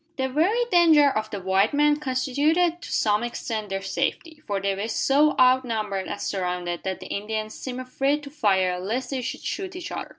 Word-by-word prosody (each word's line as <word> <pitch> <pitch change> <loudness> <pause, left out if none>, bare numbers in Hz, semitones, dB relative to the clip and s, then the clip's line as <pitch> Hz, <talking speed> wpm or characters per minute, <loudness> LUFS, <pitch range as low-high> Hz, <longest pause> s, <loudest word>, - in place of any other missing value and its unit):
The 265 -1 0
very 375 - +2
danger 315 -5 +6
of 215 -2 -2
the 205 -2 -5
white 190 +6 +1
men 295 0 +4
constituted 300 +6 +1
to - - -8
some 210 -1 +2
extent 225 -3 -4
their 195 0 -3
safety; 305 - -3
for 200 -2 -1
they 195 0 0
were 200 +3 -3
so 285 +6 +2
outnumbered 225 -7 +2
and 205 - -5
surrounded 180 -2 -3
that 190 -1 -4
the - - -8
Indians 215 +1 -3
seemed 255 -1 -6
afraid 270 +3 -1
to 280 - -9
fire 190 -9 +1
lest 240 +8 -3
they 265 -2 -2
should 255 +1 -5
shoot 380 -2 -4
each 360 -2 -6
other. - - -5
250 Hz, 195 wpm, -24 LUFS, 200-295 Hz, -, danger